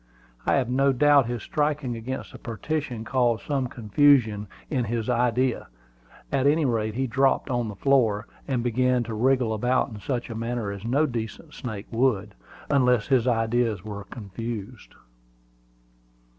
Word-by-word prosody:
I - - +4
have 135 -3 +1
no 135 +3 +3
doubt 145 -1 +4
his 120 -3 -4
striking 145 -4 -1
against 125 +4 -5
the - - -11
partition 120 +1 -3
caused 120 -3 +1
some 135 -3 0
confusion 115 -2 +3 0.2
in 130 -5 -1
his 115 -1 -2
ideas: 125 +1 +1 0.6
at 140 0 +2
any 155 +1 +3
rate, 110 -4 0
he 135 +2 0
dropped 135 +2 +1
on 120 -2 0
the 105 - -6
floor, 115 -4 +2 0.2
and 130 -4 0
began 125 +1 +2
to 115 -1 -6
wriggle 125 0 +2
about 125 +4 +1
in 110 -3 -9
such 120 0 -3
a - - -5
manner 115 -2 -2
as 100 0 -7
no 135 +7 +2
decent 115 -6 -5
snake 110 -5 -6
would, 115 -4 +1 0.3
unless 125 -5 +2
his 130 -3 +3
ideas 115 -3 +1
were 100 -2 -6
confused. 115 +1 -7
120 Hz, 155 wpm, -25 LUFS, 110-130 Hz, 0.6 s, I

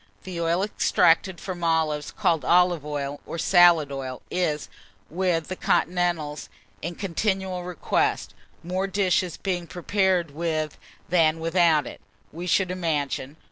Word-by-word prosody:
The 180 -3 -5
oil 170 +3 +1
extracted 190 -3 +2
from 180 -3 -6
olives, 160 -3 +1
called 160 -5 0
olive 175 +1 +3
oil, 145 -1 -4
or - - -5
salad 170 -3 +5
oil, 130 -2 -6
is, 155 - -1 0.4
with 175 -2 0
the 185 - -4
continentals, 175 -4 0 0.3
in 170 +2 -4
continual 190 0 -2
request, 180 -3 -1 0.3
more 185 +3 -2
dishes 185 -3 0
being 180 -3 -3
prepared 180 -2 0
with 155 -1 -2 0.3
than 165 -2 +3
without 165 -2 +3
it, - - -9 0.3
we 175 +3 -6
should 185 0 +2
imagine. 150 -5 -2
170 Hz, 130 wpm, -25 LUFS, 155-180 Hz, 0.4 s, salad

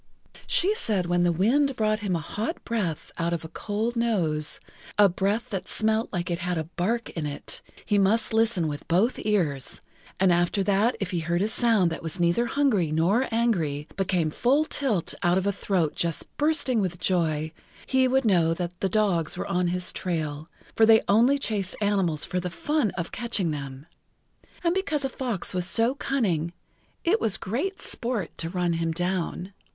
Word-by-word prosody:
She 385 +4 +3
said 205 - +1
when 175 0 +1
the 175 0 +3
wind 255 - +2
brought 215 -1 +1
him 200 -4 -1
a 165 - -2
hot 230 - -4
breath 195 -9 -2
out 170 +1 0
of 170 -1 -3
a - - -5
cold 215 +7 -3
nose, 175 -11 +1 0.4
a 205 -1 +7
breath 195 +6 -1
that 195 -3 -3
smelt 220 +1 +1
like 175 -2 -3
it 170 - -1
had 180 0 -2
a 160 - -1
bark 190 +8 -2
in 160 -3 -3
it, 145 - -3 0.2
he 205 -2 +2
must 215 +4 +2
listen 220 -7 +2
with 145 -1 -6
both 195 +9 +2
ears, 165 -11 -1 0.4
and 190 -2 +4
after 175 +3 +1
that 205 +5 +2
if 195 -2 -3
he 175 - -1
heard 170 +3 0
a - - +1
sound 220 -6 +2
that 165 - -5
was 165 +2 -3
neither 175 +8 +2
hungry 225 - +1
nor 185 +11 +2
angry, 170 -11 0
but 195 -2 -1
came 170 -5 +1
full 275 - +2
tilt 240 - -1
out 175 +1 +3
of 190 - 0
a 200 - +2
throat 185 -5 0
just 170 -2 -2
bursting 295 -6 +2
with 180 -2 -2
joy, 160 -3 +1 0.3
he 260 -1 +3
would 265 0 +2
know 170 -5 +3
that 180 0 -5
the 195 - 0
dogs 185 -6 +1
were - - -3
on 180 -2 0
his 180 +1 -1
trail, 155 -3 -3 0.3
for 220 - +5
they 220 -1 +6
only 235 +7 +4
chased 205 -8 -2
animals 195 -7 +1
for 180 - -2
the 180 0 -3
fun 290 - 0
of 170 -1 -3
catching 220 -8 -1
them, 140 -1 -6 0.8
and 340 0 +2
because 315 -7 -1
a - - -1
fox 240 -10 -3
was 180 -1 0
so 230 +6 +3
cunning,[Pg 185 - -1 0.5
17] 340 - +2
it 450 - +2
was 210 - +1
great 320 - -3
sport 230 -8 -3
to 165 - -2
run 175 -1 0
him 165 0 -1
down. 180 +2 -2
190 Hz, 190 wpm, -26 LUFS, 170-230 Hz, 0.8 s, a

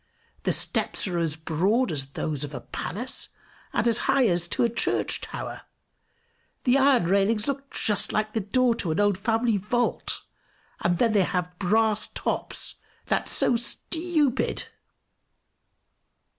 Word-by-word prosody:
The - - +3
steps - - 0
are 175 -2 -1
as 160 -3 0
broad 185 +10 +1
as 135 -4 -1
those 150 -2 -2
of 145 -1 -6
a 125 - -5
palace, 225 - -3 0.4
and - - +1
as 235 0 +4
high 270 -2 +5
as 175 -1 +1
to - - +1
a - - +5
church 235 0 -1
tower. - - -6 1.0
The 250 0 +4
iron 270 -5 +5
railings 200 +4 +2
look 275 0 -3
just 205 -2 +1
like 215 0 -1
the 225 - +1
door 245 +5 +2
to 180 - -2
an 155 - 0
old 205 -1 +3
family 225 0 +1
vault, 240 +5 -1 0.6
and 175 0 +1
then 230 +1 +3
they 205 - +5
have 180 0 -1
brass 215 +2 +2
tops - - -2 0.3
that's - - 0
so 245 - +3
stupid!" 300 +3 0
215 Hz, 145 wpm, -26 LUFS, 175-240 Hz, 1.0 s, high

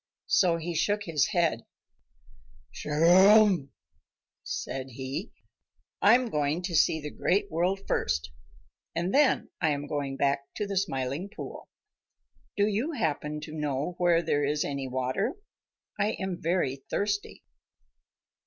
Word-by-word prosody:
So 175 -3 +3
he 170 +1 -4
shook 205 +6 0
his 155 -7 +1
head. 165 -10 +1 1.1
"Chugarum!" 180 +2 +5 0.7
said 135 0 -4
he, 135 - -5 0.7
"I 205 +3 +7
am 250 -2 0
going 150 +3 0
to 175 -2 -3
see 160 0 +4
the 150 -1 -6
Great 200 +1 0
World 180 +4 0
first, 70 +1 -1 0.6
and 175 +3 -1
then 285 -1 +3
I 160 - +3
am 145 -1 -1
going 140 -2 -3
back 140 0 0
to 210 - -2
the 200 0 -4
Smiling 145 -1 -2
Pool. 220 - -9 0.9
Do 205 - +4
you 220 +10 -1
happen 150 - -2
to 155 0 -8
know 150 +1 -2
where 175 -1 +3
there 145 -2 +1
is 150 +1 0
any 140 -1 -3
water? 130 - -1 0.6
I 205 +2 +1
am 190 -2 -4
very 165 -6 0
thirsty." 205 0 -2
165 Hz, 135 wpm, -28 LUFS, 140-195 Hz, 1.1 s, I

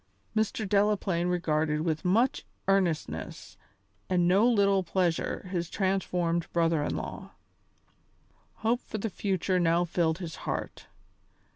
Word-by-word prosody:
Mr. 220 0 0
Delaplaine 200 -3 +1
regarded 155 -3 0
with 160 0 -1
much 230 +9 +2 0.2
earnestness 190 -5 -1 0.5
and 175 -2 +3
no 195 +6 +5
little 200 -4 +3
pleasure 180 0 -1
his 170 -3 -2
transformed 180 -3 0
brother 165 -2 +2
in 145 - -2
law. - - -6 1.3
Hope 235 +2 +3
for - - -6
the 215 0 -3
future 185 -2 0
now 170 0 +3
filled 165 -1 0
his 170 -4 -7
heart. - - -5
180 Hz, 120 wpm, -29 LUFS, 170-195 Hz, 1.3 s, no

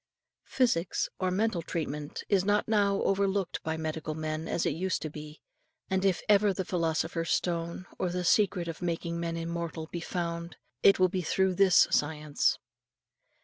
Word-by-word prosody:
Psychics, 210 -10 +1
or 185 - +1
mental 200 -1 0
treatment, 150 -3 -4
is 195 -3 +3
not 205 +1 +1
now 200 -2 +2
overlooked 195 -1 0
by 160 0 -3
medical 155 -1 -4
men 155 0 -3
as 170 - -1
it - - +2
used 185 +5 -2
to 155 - -4
be; 150 0 -10 0.5
and 190 0 +1
if 190 -2 +1
ever 205 0 +5
the 190 -1 -3
philosopher's 165 -1 -1
stone, 170 +1 -1
or 185 - 0
the 180 +1 -2
secret 185 -3 +3
of 165 - -6
making 170 -1 -2
men 165 0 -2
immortal, 165 -1 -4
be 170 - -3
found, 170 0 -4 0.3
it 195 - +6
will 185 - +5
be 185 +1 -2
through 190 +3 +1
this 190 -1 +5
science. 150 -1 +1
170 Hz, 165 wpm, -29 LUFS, 160-190 Hz, 0.5 s, it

